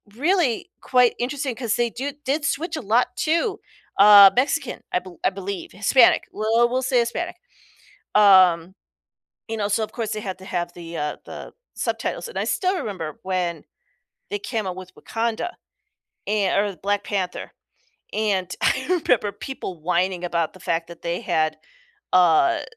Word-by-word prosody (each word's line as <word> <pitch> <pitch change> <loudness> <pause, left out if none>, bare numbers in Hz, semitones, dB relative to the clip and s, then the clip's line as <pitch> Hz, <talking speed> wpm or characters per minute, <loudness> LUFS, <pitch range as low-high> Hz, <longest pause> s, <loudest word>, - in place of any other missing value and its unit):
really 325 - +1
quite 250 -2 +3
interesting 265 +1 -2
'cause 230 -3 -1
they 240 -1 +1
do 270 +5 -5
did 285 +3 -1
switch 320 +4 -2
a - - -4
lot 230 +3 +2
to, 335 +6 0 0.4
uh, 200 -1 +10
Mexican, 275 +1 0
I - - +3
be 185 +1 -12
I - - +5
believe, 195 0 -6
Hispanic. 225 +5 +4
Well, 225 +3 +2
we'll 255 +1 0
say 255 -1 +2
Hispanic. 335 +10 -2 0.8
Um, 185 -4 +5 0.7
you 225 - -3
know, 210 -2 -1
so, 210 +2 +1
of 215 - -3
course, 225 -2 -3
they 215 - -3
had 190 -3 -5
to 190 - -13
have 175 -2 -3
the, 170 -1 -8
uh, 150 -1 -2
the - - -9 0.2
subtitles. - - -3
And 475 - -6
I - - 0
still 370 0 0
remember 185 - -5
when 180 -3 -2 0.7
they 410 - -2
came 230 - -3
out 180 - -4
with 185 0 -10
Wakanda, 230 +9 -3 0.7
and 205 -2 +1
or 200 -1 -1
Black 200 +4 -1
Panther. 190 -3 -3 0.6
And 195 -4 -1
I 260 0 +1 0.2
remember 210 -4 +2
people 195 -6 -7
whining 180 +2 0
about 170 -2 -1
the 185 - -16
fact 165 -1 -1
that 170 -1 -12
they 170 +1 -2
had, 155 0 0 0.5
uh, 185 - +4
210 Hz, 165 wpm, -23 LUFS, 185-255 Hz, 0.8 s, uh